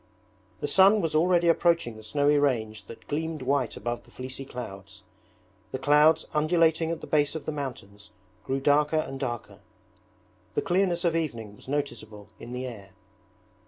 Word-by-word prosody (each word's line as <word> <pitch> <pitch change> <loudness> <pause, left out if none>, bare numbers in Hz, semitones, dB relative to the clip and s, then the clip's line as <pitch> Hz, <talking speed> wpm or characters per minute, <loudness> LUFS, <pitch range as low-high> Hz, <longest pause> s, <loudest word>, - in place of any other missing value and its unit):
The - - -1
sun 195 +3 +6
was 165 -5 -1
already 175 +2 +3
approaching 170 -7 +2
the 110 - -11
snowy 145 +6 +2
range 110 -7 0
that 115 - -12
gleamed 155 -1 -3
white 135 -2 0
above 120 0 -3
the - - -22
fleecy 130 +1 -7
clouds. 100 -6 -9 0.7
The - - -2
clouds 150 +3 +4
undulating 160 +1 +2
at 165 -1 -3
the - - -6
base 145 0 +1
of 155 -3 -5
the - - -2
mountains 105 -8 -7 0.3
grew 135 +1 -1
darker 150 +2 +3
and 135 -3 -2
darker. 120 -4 -5 1.0
The - - +1
clearness 180 -1 +1
of 165 -1 +2
evening 115 -10 -3
was - - -17
noticeable 120 -7 -4
in 120 - -9
the 125 +1 -4
air. 100 -6 -9
145 Hz, 160 wpm, -27 LUFS, 120-160 Hz, 1.0 s, sun